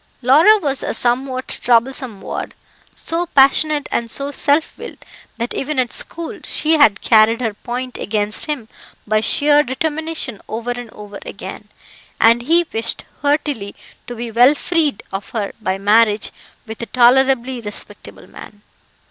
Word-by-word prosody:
Laura 315 - +6
was 280 -8 -1
a - - -2
somewhat 255 +1 -1
troublesome 240 -2 0
ward, - - -6 0.4
so 340 +2 -3
passionate 290 +1 +3
and 235 -1 -1
so 280 +4 -3
self 290 +2 +1
willed - - -10 0.3
that 235 +1 -3
even 300 +1 -3
at 250 -2 0
school 335 -1 -4
she 315 +1 +1
had 285 -11 +4
carried 225 +1 +4
her 225 -4 -2
point 250 +4 -6
against 210 +3 +1
him 285 -8 -4 0.4
by 215 0 +1
sheer 290 +5 +3
determination 300 -3 -3
over 235 +2 -4
and 245 -1 -6
over 205 -2 -11
again, - - -9 0.5
and 230 +1 +5
he 335 +7 +3
wished 225 +1 -2 0.2
heartily 285 -8 -1 0.3
to 245 - -6
be 235 0 -6
well 245 +6 +5
freed 315 - 0
of 195 +1 -6
her 205 -2 -2
by 190 -3 -1
marriage 210 +1 +2 0.3
with 220 -1 -8
a 235 - -5
tolerably 255 0 +3
respectable 210 -2 -8
man. 205 0 -14
245 Hz, 150 wpm, -18 LUFS, 225-290 Hz, 0.5 s, Laura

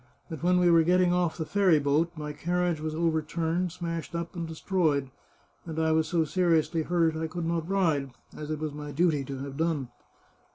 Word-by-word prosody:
But 160 - -6
when 180 +1 +3
we 175 -1 +4
were 165 -1 +6
getting 180 +1 +3
off 180 -2 0
the 160 - -3
ferry 190 -3 +3
boat 150 +4 +1
my 150 -1 -5
carriage 175 +1 -1
was 155 0 -3
over 160 -1 +1
turned, 165 +3 -1
smashed 165 0 -5
up, 170 +2 -4
and 170 -1 -4
destroyed, 155 -5 0 0.5
and 160 -2 -7
I 160 0 +2
was 160 0 +2
so 165 -3 +1
seriously 165 -1 +1
hurt 165 0 +1
that 160 - -4
I 160 - -1
could 170 +1 -4
not 165 0 -2
ride, 160 -8 +1 0.3
as 150 0 -7
it 155 - -2
was 155 -1 -4
my 150 0 -7
duty 155 -1 +2
to 135 0 -6
have 140 -1 -7
done." 160 -6 -1
165 Hz, 210 wpm, -28 LUFS, 155-175 Hz, 0.5 s, were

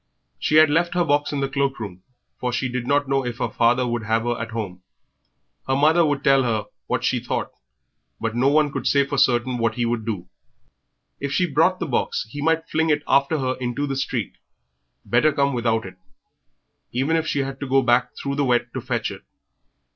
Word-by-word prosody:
She 150 - 0
had 155 -1 +7
left 170 +3 +1
her 175 -1 +2
box 145 -1 +1
in 145 -2 -2
the 135 - +1
cloak 135 -1 -1
room, 95 -4 -7 0.4
for 125 - -1
she 120 +2 -1
did 125 -1 -4
not 145 0 +2
know 135 0 +1
if 120 -1 -4
her 120 -2 -2
father 120 +3 +2
would 120 -1 -2
have 110 +1 0
her 120 0 0
at 115 - -4
home. 100 -6 -5 0.9
Her 135 - +1
mother 155 +5 +4
would 145 -2 0
tell 135 -1 +5
her 115 -4 -1 0.2
what - - -1
she - - +1
thought, - - -3 0.7
but 115 0 -2
no 125 +3 +2
one 145 0 +3
could - - -3
say 140 -1 +3
for 140 0 -2
certain 120 0 +2
what 115 -1 0
he 120 - 0
would 115 -1 -1
do. 105 -5 -4 0.9
If 140 -1 -3
she 180 +6 +2
brought 165 +4 +2
the - - -2
box 130 -6 -1
he 145 - -6
might 160 +1 +1
fling 160 +1 0
it 145 -1 +2
after 140 +3 +3
her 130 -2 -1
into 125 +3 -2
the 135 -1 -3
street; 130 -5 -3 0.7
better 155 - +3
come 140 -1 +1
without 115 -3 0
it, 95 - -10 0.9
even 135 +7 0
if 165 -1 0
she 140 - 0
had 135 0 -5
to 140 - -4
go 135 0 +4
back 120 0 +3
through 140 - -3
the 145 - +2
wet 120 -1 +1
to - - -4
fetch - - -2
it. - - -9
135 Hz, 215 wpm, -23 LUFS, 120-145 Hz, 0.9 s, had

